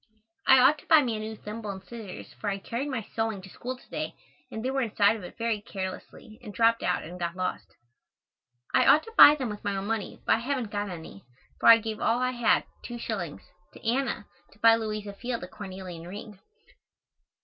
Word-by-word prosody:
I 265 - +9
ought 265 +4 +5
to - - -19
buy 315 -3 +7
me 235 -3 -1
a - - -4
new 220 +1 -5
thimble 215 0 -7
and 190 -1 -6
scissors 205 -2 -9
for 210 - -4
I 195 - -1
carried 235 +8 -4
my 255 -5 -2
sewing 225 -3 -1
to 190 - -11
school 255 +6 -6
to - - -20
day - - -4 0.3
and 220 +2 -6
they 260 - 0
were 270 0 0
inside 215 -2 +3
of 215 - -8
it 180 - -10
very 230 -2 -1
carelessly 205 +3 -7
and 220 -4 -8
dropped 230 +3 +3
out - - 0
and 175 +3 -9
got 170 0 -2
lost. 185 0 -4 1.0
I 125 - +4
ought 305 - +7
to 455 - -12
buy 295 - +10
them 260 -5 -3
with 210 -1 -7
my 200 -1 -1
own 195 0 -3
money, 220 -2 -3
but - - +4
I - - -5
haven't 250 -3 -2
got 205 -1 -2
any, 160 - -9 0.4
for - - +6
I 230 - +11
gave 220 -1 -5
all 230 - +2
I 255 0 +1
had 240 -3 +3 0.2
(two 240 - -6
shillings) 195 -9 -4 0.3
to - - -10
Anna 245 -3 0 0.3
to - - -23
buy 225 +1 +6
Louisa 215 -2 -4
Field 240 +1 -4
a - - -6
cornelian 185 -3 -8
ring. 205 +1 -9
220 Hz, 220 wpm, -28 LUFS, 195-240 Hz, 1.0 s, I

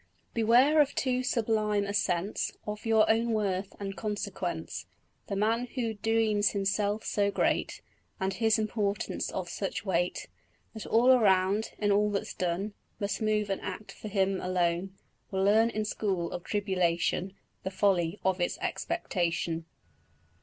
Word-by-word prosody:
Beware 245 +7 +5
of 285 -1 0
too 255 -1 +1
sublime 215 -4 +1
a 200 - -3
sense 190 0 0
Of 210 +1 -5
your 220 -1 +5
own 225 +1 +2
worth 195 -3 -1
and 195 -1 -4
consequence: 90 - -4 0.4
The 200 - -2
man 225 +4 +1
who 230 -3 -1
dreams 215 -1 +2
himself 205 +1 0
so 200 -1 +1
great, - - 0 0.4
And 190 0 0
his 220 +2 +3
importance 210 -2 -1
of 185 -2 -3
such 185 +1 -4
weight, 175 -2 0 0.5
That 220 - -7
all 240 +3 +5
around, 200 -3 +3
in 205 -1 +1
all 210 +1 +3
that's 200 -1 -2
done, 185 +4 -2 0.3
Must 200 +2 -2
move 210 -2 +1
and 195 - -2
act 215 - -6
for - - -9
him 195 -2 +1
alone, 180 +1 0 0.3
Will 190 -1 0
learn 220 +3 +5
in 215 -2 -2
school 190 -5 -1
of 175 - -5
tribulation 185 -2 0 0.3
The 190 - -3
folly 190 -2 +1
of 190 -1 +2
his 175 - 0
expectation. 175 - -2
205 Hz, 145 wpm, -29 LUFS, 190-220 Hz, 0.5 s, Beware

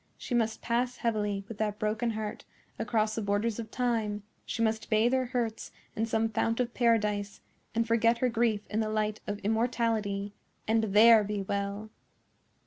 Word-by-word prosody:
She - - -6
must 225 -2 0
pass 245 +1 0
heavily, 210 -3 -1
with 215 -2 -9
that 210 -1 -1
broken 215 +3 0
heart, 215 -1 -4 0.4
across 215 -1 +1
the 225 - -2
borders 205 +2 0
of 225 -1 -5
Time—she 220 -2 -2
must 220 0 -1
bathe 225 +3 +3
her 260 -1 +1
hurts 235 -3 -3 0.2
in 225 +1 0
some 225 0 +1
fount 225 +1 0
of 245 -1 -1
paradise, 210 -4 +1 0.4
and 230 0 +2
forget 230 +1 +3
her 255 - +2
grief 225 -3 +1
in 215 - -2
the 215 -1 0
light 215 0 -1
of 205 0 -2
immortality, 220 -2 0 0.3
and 220 0 +2
THERE 220 +2 +7
be 205 -1 -3
well. 200 +2 -3
220 Hz, 165 wpm, -29 LUFS, 210-230 Hz, 0.4 s, THERE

